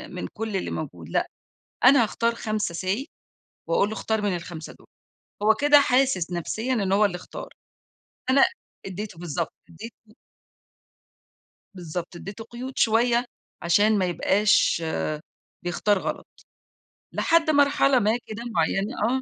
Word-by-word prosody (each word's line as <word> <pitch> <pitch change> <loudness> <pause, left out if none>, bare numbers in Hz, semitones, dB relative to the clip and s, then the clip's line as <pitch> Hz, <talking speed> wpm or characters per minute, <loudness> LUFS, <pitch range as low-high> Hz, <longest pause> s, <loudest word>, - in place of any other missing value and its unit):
من - - -4
كل 220 -2 -4
اللي - - -3
موجود، 85 - -6
لأ، - - 0 0.6
أنا 255 0 +7
هاختار 230 +1 0
5 215 -6 -2
say 190 +9 -1 0.6
واقول 180 +4 +2
لُه 220 - -4
اختار 220 -1 -1
من 200 -3 0
ال5 170 -2 -8
دوُل، - - -20 0.6
هو 220 +1 +5
كده 290 +3 +6
حاسس 250 -10 +2
نَفْسيًا 220 +8 -2
إنه 200 -6 +1
هو 210 +1 +4
اللي 185 -3 +1
اختار، 180 - -9 0.8
أنا 275 +5 +6 0.4
ادّيته 195 -2 -6
بالضبط 170 -1 -3 0.2
ادّيته 220 +5 -12 1.6
بالضبط، 175 0 -6
ادّيته 200 +5 -8
قيود 250 +3 -8
شوية، 235 +2 +3 0.4
عشان 205 +5 +3
ما 190 - +2
يبقاش 185 0 +2 0.8
بيختار 185 +3 +1
غلط، - - -4 0.9
لحد 330 -1 +2
مرحلة 280 -3 +4
ما 215 +2 +2
كده 220 +2 -6
معيّنة، 195 +8 +1 0.2
آه. 265 - -4
210 Hz, 130 wpm, -25 LUFS, 180-235 Hz, 1.6 s, أنا